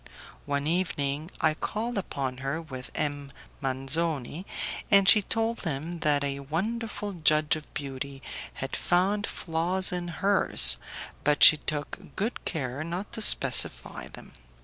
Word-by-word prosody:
One 140 0 -2
evening 150 -3 -2
I 155 -2 +2
called 225 +9 -5
upon 135 -9 -4
her 135 +4 -4
with 130 -6 -9
M. 145 -2 -3 0.3
Manzoni, 140 +4 -2 0.4
and 200 -1 +4
she 210 - +6
told 225 +3 -3
him 165 +1 -5
that 145 -2 +1
a 140 -1 -3
wonderful 205 - -4
judge 155 -3 +2
of 155 -1 -11
beauty 135 -1 -7 0.3
had 135 - -5
found 195 +4 0
flaws 180 +3 +1
in 175 -1 -4
hers, 170 - +7 0.5
but 150 -1 +2
she 155 - +10
took 150 +6 -6
good 220 +5 -4
care 140 -3 -4
not 175 +5 -6
to 220 - -5
specify - - +3
them. - - -14
155 Hz, 135 wpm, -26 LUFS, 140-185 Hz, 0.5 s, she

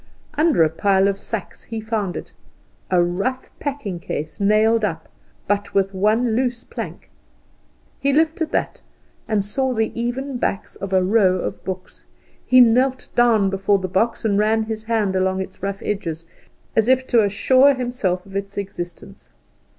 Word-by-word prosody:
Under 300 - +3
a 155 - +3
pile 195 +3 +2
of 200 - +1
sacks 220 -1 -6
he 225 -1 -5
found 215 -4 -2
it - - -8 0.6
a 180 -2 +4
rough 195 +10 -2
packing 265 -11 -4
case, 155 -2 -5
nailed 215 +2 +3
up, 165 -6 -2 0.4
but 205 0 -1
with 195 0 +2
one 220 +4 +2
loose 245 -1 -1
plank. - - -8 0.9
He 280 - +1
lifted 320 +2 +1
that, - - -2 0.5
and 210 -3 0
saw 260 +5 0
the 220 0 0
even 250 +3 -3
backs 210 -3 -2
of 195 0 -6
a 190 -1 +3
row 190 -1 +3
of 185 - -4
books. 185 -1 -7 0.4
He 255 - +5
knelt 255 +2 +3
down 225 -5 +3
before 195 +1 +2
the 190 -1 -3
box, 225 +6 0
and 205 -2 +2
ran 220 +1 +2
his 220 0 -5
hand 220 -4 0
along 190 0 +1
its 190 0 -7
rough 195 +1 -4
edges, 165 -5 -3 0.5
as 220 0 +3
if 260 0 +3
to 235 -4 +4
assure 260 +7 +4
himself 240 -8 -2
of 195 0 -13
its 200 0 -4
existence. 190 -3 -7
210 Hz, 165 wpm, -21 LUFS, 190-240 Hz, 0.9 s, He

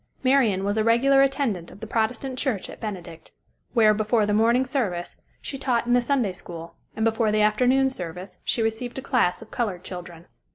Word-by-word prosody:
Marian 250 -8 +3
was 205 +2 -1
a 215 - +2
regular 265 +5 +4
attendant 265 -10 0
of - - -14
the 220 - -6
Protestant 235 +4 -2
church 240 -9 -2
at - - -12
Benedict, 175 -6 -7 0.4
where, 215 -2 +6
before 215 +1 +1
the 205 - 0
morning 235 +4 +3
service, 205 -10 -2 0.3
she 275 - -6
taught 245 -4 0
in 240 - +1
the 245 - +5
Sunday 240 -6 0
school, 170 -2 -9 0.2
and 220 - 0
before 225 -1 +2
the 215 0 +2
afternoon 250 +5 +3
service 180 -5 -7
she 230 - 0
received 225 +3 -3
a 265 - -5
class 230 -8 +1
of 220 - -19
colored 200 -7 -2
children. 175 -2 -8
220 Hz, 195 wpm, -24 LUFS, 190-250 Hz, 0.4 s, where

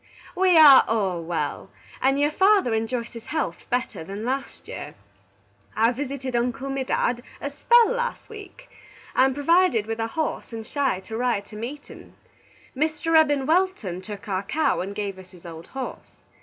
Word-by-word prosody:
"We 365 -2 +4
are 290 -4 +9
all 195 -6 0
well, 165 0 -3 0.3
and 270 +1 +2
your 295 +1 +2
father 385 - +3
enjoys 230 +2 -2
his 230 -1 -10
helth 300 - -3
better 245 -9 -2
than 200 +6 -6
last 270 +2 -4
year. - - -8 0.8
I 225 +2 +3
visited 265 0 -4
Uncle 245 +3 -1
Medad 260 -2 -1 0.2
a 285 - -4
spell 470 +12 +4
last 485 -1 -3
week. 435 +3 -12 0.5
I 260 - +5
am 265 -1 0
provided 290 - +3
with 225 +1 -4
a 225 - -1
horse 310 +4 -3
and 225 -1 -6
shay 270 -8 -1
to 220 +3 -8
ride 235 -4 0
to 210 - -13
meatin. 250 +7 -9 0.6
Mr. 310 +3 0
Eben 290 -4 +4
Welton 315 - 0
took 205 +1 -9
our 190 -2 -1
cow 270 +11 0
and 195 +2 -4
give 200 -2 -4
us 185 -1 -14
his 180 -1 -17
old 165 -1 -9
horse. 265 -1 -7
255 Hz, 170 wpm, -24 LUFS, 215-305 Hz, 0.8 s, are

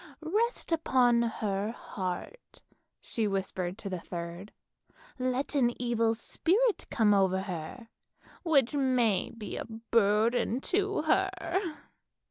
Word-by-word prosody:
Rest 430 +6 0
upon 250 -7 +3
her 210 -3 -1
heart," 190 - -6 0.4
she 225 -2 -2
whispered 190 -2 -2
to 220 - -7
the 185 -2 -3
third. 170 +3 -7 0.4
" - - -35 0.2
Let 255 +3 -1
an 240 -4 +2
evil 230 -2 +1
spirit 405 - +1
come 215 -2 +3
over 190 -1 +3
her, 190 +5 -6 0.5
which 290 -7 +3
may 255 -7 +2
be 230 -3 -7
a - - -4
burden 225 +1 +1
to 400 +1 0
her." 380 +4 +3
230 Hz, 115 wpm, -30 LUFS, 200-275 Hz, 0.5 s, upon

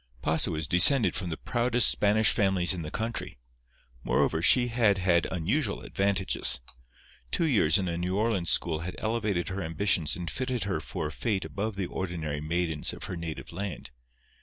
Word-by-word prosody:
Pasa 80 +2 +1
was 80 -3 -3
descended 110 - +6
from 90 -4 -4
the 80 - -4
proudest 120 0 +2
Spanish 105 +1 +3
families 95 -3 +3
in 90 - -5
the 75 - -6
country. 115 - -4 0.7
Moreover, 80 - +1
she 120 +7 +4
had 115 -4 +2
had 90 -2 +2
unusual 100 - -1
advantages. 95 -1 0 0.7
Two 165 - 0
years 105 - +3
in 95 -2 -2
a 85 0 -3
New 90 +2 -2
Orleans 105 -5 +1
school 80 -3 +2
had 90 +3 -6
elevated 105 -6 -2
her 95 +1 -4
ambitions 85 -1 0
and 90 -1 -6
fitted 130 -2 -3
her 95 -4 -2
for 80 - -5
a 75 - -4
fate 100 +2 -2
above 100 +7 -4
the 100 -1 -3
ordinary 80 -6 -4
maidens 80 -1 -1
of - - -10
her 90 - -5
native 85 -2 -7
land. 90 -7 -6
95 Hz, 175 wpm, -27 LUFS, 85-110 Hz, 0.7 s, descended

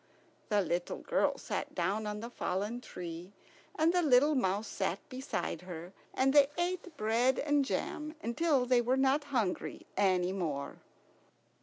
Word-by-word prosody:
The 210 -2 +3
little 175 0 -2
girl - - +1
sat - - -4
down 195 +5 0
on 210 0 -4
the 235 +1 -6
fallen 210 +4 -2
tree, 175 -2 -8 0.4
and 320 +2 +3
the 360 - +3
little 290 0 +5
mouse 205 -4 0
sat 190 -1 -1
beside 255 - -3
her, 180 0 -8 0.2
and 270 +1 +3
they 285 -2 +7
ate 350 -2 -2
bread 235 +4 +2
and 290 -1 +2
jam 305 +3 -3
until 270 +2 +2
they 250 -1 +4
were 250 +3 +1
not 270 +2 +3
hungry 235 -10 -2
any 185 -2 +2
more. 150 -7 -3
235 Hz, 150 wpm, -32 LUFS, 185-280 Hz, 0.4 s, they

